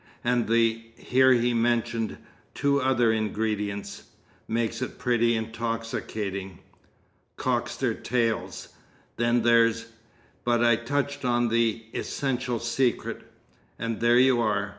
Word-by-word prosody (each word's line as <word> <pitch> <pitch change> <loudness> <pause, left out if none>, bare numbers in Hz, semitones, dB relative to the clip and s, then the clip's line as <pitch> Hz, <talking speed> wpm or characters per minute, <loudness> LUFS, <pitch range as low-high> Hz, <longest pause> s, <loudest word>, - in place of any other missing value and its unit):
"And 120 -1 +1
the" 115 0 +2
(here 130 +2 +3
he 120 0 +2
mentioned 115 -1 0 0.4
two 140 0 +1
other 125 -3 +3
ingredients) 105 -2 -2 0.4
"makes 115 +1 -1
it 130 - -4
pretty 120 -1 +2
intoxicating. 110 -4 -4 0.8
Cocks - - -1
their - - 0
tails. 115 -2 -2 0.5
Then 120 0 +2
there's" 115 -1 +3 0.5
(but 120 -1 +2
I 120 -1 +5
touch 140 +4 -2
on 120 -1 +1
the 115 0 +1
essential 125 -3 -2
secret.) 120 +2 -1 0.5
"And 115 -1 -3
there 120 +1 +4
you 125 -1 +4
are. 105 -2 0
115 Hz, 115 wpm, -26 LUFS, 110-120 Hz, 0.8 s, I